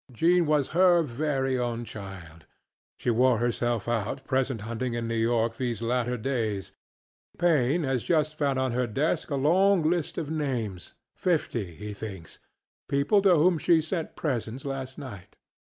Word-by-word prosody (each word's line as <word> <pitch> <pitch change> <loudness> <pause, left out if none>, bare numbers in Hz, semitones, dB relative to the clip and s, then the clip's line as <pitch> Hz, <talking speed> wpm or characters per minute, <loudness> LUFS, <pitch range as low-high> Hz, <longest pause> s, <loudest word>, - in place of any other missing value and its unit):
Jean 170 +7 +3
was 150 -3 +2
her 175 0 +5
very 135 -1 -1
own 120 -1 -2
childŌĆöshe 95 +2 -8
wore 125 +1 +4
herself 120 -2 -1
out 120 +3 -2
present 130 -3 0
hunting 115 +2 -3
in 115 -1 -2
New 115 - -2
York 115 0 +1
these 120 -3 -2
latter 120 +1 0
days. 110 -6 -2 0.7
Paine 160 -2 +2
has 130 -3 0
just 155 0 +1
found 140 -3 0
on 130 -1 0
her 125 +1 0
desk 140 +8 -1
a 145 - -1
long 180 +6 +3
list 170 -2 -1
of 155 -4 -3
namesŌĆöfifty, 120 - -3
he 105 +1 -6
thinksŌĆöpeople 110 - -3
to 195 -3 +5
whom 165 +1 +3
she 165 +2 +4
sent 160 +1 -3
presents 130 -3 -3
last 135 -1 -5
night. 105 -10 -10
130 Hz, 145 wpm, -27 LUFS, 115-155 Hz, 0.7 s, her